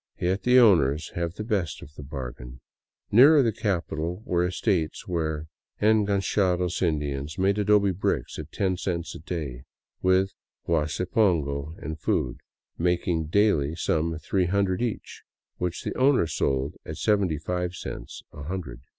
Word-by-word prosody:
Yet 95 Hz, +3 st, 0 dB
the 125 Hz, +1 st, +4 dB
owners 80 Hz, -, +4 dB
have 85 Hz, 0 st, -3 dB
the 105 Hz, -, -4 dB
best 100 Hz, -7 st, -2 dB
of 75 Hz, -, -13 dB
the 75 Hz, -, -10 dB
bargain. 65 Hz, -3 st, -7 dB, 0.5 s
Nearer 140 Hz, +6 st, +7 dB
the 115 Hz, -, +2 dB
capital 90 Hz, -2 st, -2 dB
were 90 Hz, -1 st, +1 dB
estates 90 Hz, -2 st, -1 dB
where 80 Hz, -3 st, -2 dB, 0.3 s
en 105 Hz, -1 st, +3 dB
ganchados 95 Hz, -3 st, +1 dB
Indians 75 Hz, -3 st, -1 dB
made 100 Hz, +2 st, +2 dB
adobe 105 Hz, -1 st, +4 dB
bricks 95 Hz, +2 st, -2 dB
at -, -, -8 dB
ten 95 Hz, -2 st, 0 dB
cents 85 Hz, -2 st, -3 dB
a -, -, -8 dB
day, 75 Hz, -6 st, -5 dB, 0.4 s
with 95 Hz, +1 st, +3 dB, 0.3 s
huasi 80 Hz, +1 st, 0 dB
pongo 80 Hz, -8 st, +1 dB
and 80 Hz, +2 st, -6 dB
food, 60 Hz, -4 st, -1 dB, 0.4 s
making 85 Hz, -2 st, 0 dB
daily 80 Hz, -5 st, +2 dB
some 80 Hz, -1 st, 0 dB
three 90 Hz, +3 st, 0 dB
hundred 95 Hz, +1 st, +1 dB
each, 120 Hz, -3 st, -4 dB, 0.4 s
which 90 Hz, -1 st, -3 dB
the -, -, -3 dB
owner 130 Hz, -6 st, +4 dB
sold 70 Hz, -3 st, -1 dB
at 80 Hz, -, -7 dB
seventy 95 Hz, -2 st, +1 dB
five 90 Hz, +3 st, -3 dB
cents -, -, -7 dB
a 75 Hz, -, -9 dB
hundred. 75 Hz, -6 st, -5 dB
90 Hz, 150 wpm, -26 LUFS, 75-100 Hz, 0.5 s, Nearer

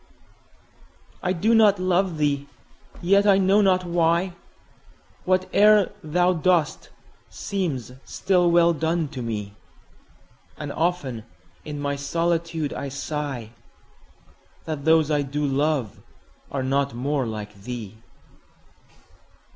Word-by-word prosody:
I 180 Hz, -, 0 dB
do 200 Hz, +6 st, +1 dB
not 215 Hz, -3 st, +5 dB
love 185 Hz, -1 st, +1 dB
thee!—yet, 150 Hz, +7 st, -1 dB
I 195 Hz, -1 st, +6 dB
know 195 Hz, +2 st, +4 dB
not 185 Hz, -2 st, +2 dB
why, 170 Hz, +1 st, +1 dB
5 175 Hz, -, -16 dB, 1.1 s
Whate'er 210 Hz, 0 st, +4 dB
thou 175 Hz, +4 st, +2 dB
dost 170 Hz, -2 st, 0 dB, 0.4 s
seems 165 Hz, -, -3 dB
still 180 Hz, -2 st, +1 dB
well 170 Hz, 0 st, +4 dB
done, 160 Hz, 0 st, -1 dB
to 130 Hz, -, -7 dB
me: 105 Hz, -4 st, -4 dB, 1.0 s
And 145 Hz, -2 st, -5 dB
often 145 Hz, -9 st, -2 dB, 0.4 s
in 150 Hz, -1 st, -6 dB
my 140 Hz, 0 st, -2 dB
solitude 165 Hz, 0 st, -1 dB
I 140 Hz, -, -5 dB
sigh 140 Hz, -5 st, -5 dB, 1.1 s
That 155 Hz, -3 st, -5 dB
those 160 Hz, -1 st, +4 dB
I 150 Hz, -1 st, +2 dB
do 145 Hz, +2 st, -2 dB
love 140 Hz, -4 st, -1 dB, 0.5 s
are 135 Hz, -2 st, -2 dB
not 135 Hz, -1 st, 0 dB
more 135 Hz, +1 st, -1 dB
like 105 Hz, -1 st, -6 dB
thee! 110 Hz, 0 st, -8 dB
155 Hz, 110 wpm, -24 LUFS, 140-180 Hz, 1.1 s, I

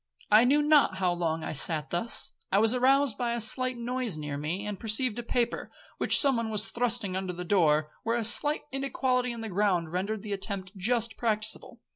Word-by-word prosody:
I 215 Hz, +3 st, +7 dB
knew 290 Hz, +4 st, +3 dB
not 295 Hz, -9 st, +4 dB
how 180 Hz, -2 st, +1 dB
long 165 Hz, -2 st, -2 dB
I -, -, -4 dB
sat 155 Hz, +1 st, 0 dB
thus. 175 Hz, +7 st, +1 dB, 0.2 s
I 195 Hz, -, +3 dB
was 220 Hz, +3 st, +3 dB
aroused 265 Hz, -1 st, +2 dB
by 240 Hz, -1 st, -1 dB
a 235 Hz, -, -2 dB
slight 255 Hz, +3 st, 0 dB
noise 240 Hz, -5 st, -3 dB
near 150 Hz, -2 st, -5 dB
me, 160 Hz, +8 st, -4 dB
and 205 Hz, -2 st, -5 dB
perceived 230 Hz, +1 st, -1 dB
a -, -, -2 dB
paper, 240 Hz, 0 st, -2 dB, 0.3 s
which -, -, +5 dB
some 275 Hz, -4 st, +3 dB
one 230 Hz, -1 st, -2 dB
was 215 Hz, -2 st, -1 dB
thrusting 235 Hz, -5 st, -1 dB
under 190 Hz, -1 st, -3 dB
the 180 Hz, +1 st, -7 dB
door, 155 Hz, -5 st, +2 dB
where 230 Hz, +1 st, -1 dB
a 235 Hz, -, -1 dB
slight 295 Hz, +7 st, +4 dB
inequality 255 Hz, -2 st, -1 dB
in 235 Hz, -1 st, -7 dB
the 225 Hz, -, -5 dB
ground 185 Hz, -4 st, 0 dB
rendered 195 Hz, +4 st, -3 dB
the 210 Hz, -2 st, -4 dB
attempt 195 Hz, -1 st, -5 dB
just 225 Hz, +3 st, -1 dB
practicable. 215 Hz, -2 st, -3 dB
220 Hz, 205 wpm, -28 LUFS, 185-245 Hz, 0.3 s, I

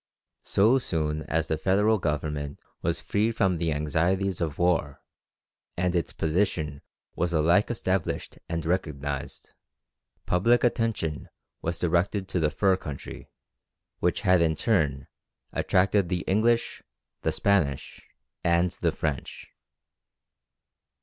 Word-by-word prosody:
So 115 Hz, +7 st, +4 dB
soon 75 Hz, -8 st, -2 dB
as 80 Hz, 0 st, 0 dB
the 80 Hz, -, -1 dB
Federal 105 Hz, +5 st, +3 dB
Government 75 Hz, -2 st, -2 dB, 0.2 s
was -, -, 0 dB
free 105 Hz, +3 st, 0 dB
from 95 Hz, -5 st, +1 dB
the 85 Hz, -1 st, 0 dB
anxieties 85 Hz, +6 st, 0 dB
of 80 Hz, -4 st, -2 dB
war, 85 Hz, -5 st, +1 dB, 0.8 s
and 90 Hz, 0 st, 0 dB
its 85 Hz, -, 0 dB
position 80 Hz, -4 st, -1 dB, 0.3 s
was 85 Hz, 0 st, -1 dB
alike 85 Hz, +6 st, +3 dB
established 95 Hz, -6 st, -2 dB
and 85 Hz, -2 st, -2 dB
recognized, 70 Hz, -5 st, -3 dB, 0.7 s
public 115 Hz, +7 st, +3 dB
attention 115 Hz, -10 st, 0 dB, 0.3 s
was 85 Hz, +1 st, -2 dB
directed 90 Hz, +3 st, 0 dB
to 90 Hz, -, 0 dB
the 75 Hz, -2 st, +2 dB
"fur 95 Hz, +4 st, +2 dB
country," 75 Hz, -6 st, -8 dB, 0.7 s
which -, -, +1 dB
had 90 Hz, -1 st, +4 dB
in 80 Hz, -1 st, +2 dB
turn 75 Hz, -, +1 dB, 0.5 s
attracted 95 Hz, 0 st, +2 dB
the 90 Hz, -2 st, -1 dB
English, 115 Hz, +5 st, +1 dB, 0.4 s
the 80 Hz, -, 0 dB
Spanish, 80 Hz, -5 st, 0 dB, 0.4 s
and 85 Hz, +1 st, +3 dB
the -, -, -1 dB
French. 75 Hz, -5 st, -4 dB
85 Hz, 115 wpm, -27 LUFS, 75-95 Hz, 0.8 s, So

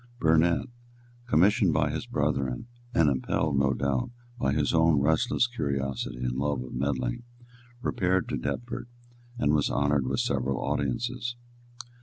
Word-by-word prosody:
Burnet, 80 Hz, +4 st, +3 dB, 0.6 s
commissioned 100 Hz, -2 st, +4 dB
by -, -, +2 dB
his -, -, -4 dB
brethren, 70 Hz, -, -1 dB, 0.3 s
and 85 Hz, -9 st, +3 dB
impelled, 70 Hz, +1 st, +1 dB
no 70 Hz, -1 st, +2 dB
doubt, 70 Hz, -3 st, 0 dB, 0.3 s
by 70 Hz, -, +1 dB
his 75 Hz, 0 st, +1 dB
own 80 Hz, -2 st, +4 dB
restless 80 Hz, -, +2 dB
curiosity 70 Hz, -, -3 dB
and 60 Hz, +1 st, -1 dB
love 70 Hz, -2 st, 0 dB
of 65 Hz, -, -9 dB
meddling, 65 Hz, -, -1 dB, 0.6 s
repaired 95 Hz, -1 st, +1 dB
to 70 Hz, -, -1 dB
Deptford 120 Hz, -, -4 dB, 0.5 s
and 75 Hz, -10 st, +2 dB
was 75 Hz, -2 st, +2 dB
honoured 70 Hz, -2 st, +1 dB
with -, -, 0 dB
several 65 Hz, -1 st, 0 dB
audiences. 120 Hz, +1 st, -2 dB
70 Hz, 135 wpm, -28 LUFS, 70-85 Hz, 0.6 s, commissioned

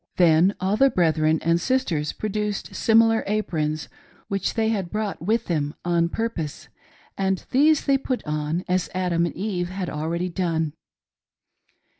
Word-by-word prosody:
Then 175 Hz, +2 st, +4 dB
all 190 Hz, +3 st, 0 dB
the 270 Hz, +2 st, +5 dB
brethren 160 Hz, -5 st, +2 dB
and 165 Hz, +1 st, +2 dB
sisters 180 Hz, -, 0 dB
produced 210 Hz, -1 st, -3 dB
similar 225 Hz, 0 st, +4 dB
aprons 155 Hz, -7 st, -1 dB, 0.4 s
which 195 Hz, -2 st, -1 dB
they 220 Hz, -1 st, +1 dB
had 195 Hz, -6 st, -1 dB
brought 210 Hz, 0 st, -3 dB
with 220 Hz, +6 st, 0 dB
them 150 Hz, -3 st, -1 dB
on 170 Hz, -1 st, +2 dB
purpose, 175 Hz, -9 st, -4 dB, 0.5 s
and 190 Hz, -1 st, 0 dB
these 300 Hz, +3 st, +4 dB
they 275 Hz, -1 st, +3 dB
put 255 Hz, -2 st, -3 dB
on, 150 Hz, +3 st, -2 dB
as 185 Hz, 0 st, 0 dB
Adam 175 Hz, -2 st, +1 dB
and -, -, -7 dB
Eve 180 Hz, -3 st, -2 dB
had 185 Hz, -1 st, -4 dB
already 165 Hz, +4 st, -2 dB
done. 165 Hz, -4 st, -1 dB
185 Hz, 145 wpm, -24 LUFS, 165-215 Hz, 0.5 s, the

